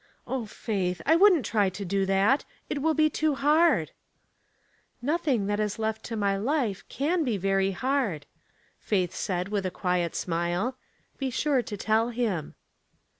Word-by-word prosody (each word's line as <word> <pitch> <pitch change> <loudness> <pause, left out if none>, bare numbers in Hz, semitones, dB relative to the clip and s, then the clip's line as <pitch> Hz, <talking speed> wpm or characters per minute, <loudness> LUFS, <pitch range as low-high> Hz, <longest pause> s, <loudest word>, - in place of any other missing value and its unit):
''O 245 -5 -3
Faith! 190 -6 -2
I 320 - +5
wouldn't 360 - +5
try 210 -3 +2
to 190 +2 -6
do 195 +1 0
that; 195 +8 +3 0.3
it 285 - -1
will 320 +1 +2
be 310 0 +4
too 305 -1 0
hard." 305 +5 +3 1.1
"Nothing 275 - 0
that 205 +1 -1
is 210 -1 -1
left 220 0 -2
to 230 - -4
my 200 -2 +1
life 225 -4 -1
can 320 +5 0
be 240 -7 0
very 195 0 +1
hard," 220 - -1 0.5
Faith 185 -5 0
said, 180 0 -2
with 205 -2 -1
a 185 - -1
quiet 180 -2 -1
smile. 175 +8 -1 0.2
*' - - -40
Be 270 -1 -1
sure 275 +1 +1
to 210 -3 -6
tell 220 +3 +1
him." 225 -10 -2
220 Hz, 165 wpm, -27 LUFS, 195-275 Hz, 1.1 s, I